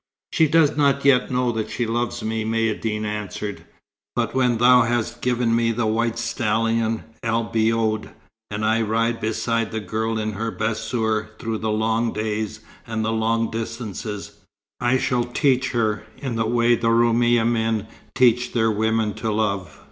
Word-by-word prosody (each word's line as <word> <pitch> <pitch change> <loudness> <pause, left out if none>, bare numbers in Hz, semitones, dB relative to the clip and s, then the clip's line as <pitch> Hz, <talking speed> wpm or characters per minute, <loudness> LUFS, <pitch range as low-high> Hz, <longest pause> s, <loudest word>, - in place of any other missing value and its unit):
"She 160 - +4
does 155 -1 +4
not 140 -2 +2
yet 130 -2 +4
know 125 -1 +1
that 110 -2 -3
she 120 - -2
loves 120 +1 -2
me," 110 0 -1
Maïeddine 110 -1 -1
answered. 105 -1 -5 0.5
"But 115 -2 -1
when 125 -3 +2
thou 125 +2 +6
hast 120 0 -1
given 120 -2 +1
me 115 0 +2
the 115 0 -1
white 115 +1 0
stallion 115 -1 0 0.2
El 115 0 0
Biod, 110 -1 +1 0.4
and 105 +1 -2
I 110 +1 +2
ride 115 +1 0
beside 115 +1 -1
the 110 - -2
girl 110 +3 -2
in 110 0 -2
her 110 +3 -3
bassour 110 0 -2
through 115 -2 -3
the 110 - -2
long 110 +2 0
days 110 0 -3 0.3
and 110 -1 -2
the 110 - 0
long 115 +1 0
distances, 110 -3 -5 0.5
I 125 +1 +2
shall 125 -2 +1
teach 130 +1 +1
her, 110 -3 0
in 130 -4 -4
the 115 -1 0
way 120 +1 +3
the 115 0 0
Roumi 120 +1 +4
men 115 -2 0 0.3
teach 125 -1 +3
their 115 -2 +2
women 110 0 0
to 110 0 -2
love." 100 -7 -2
115 Hz, 165 wpm, -22 LUFS, 110-120 Hz, 0.5 s, thou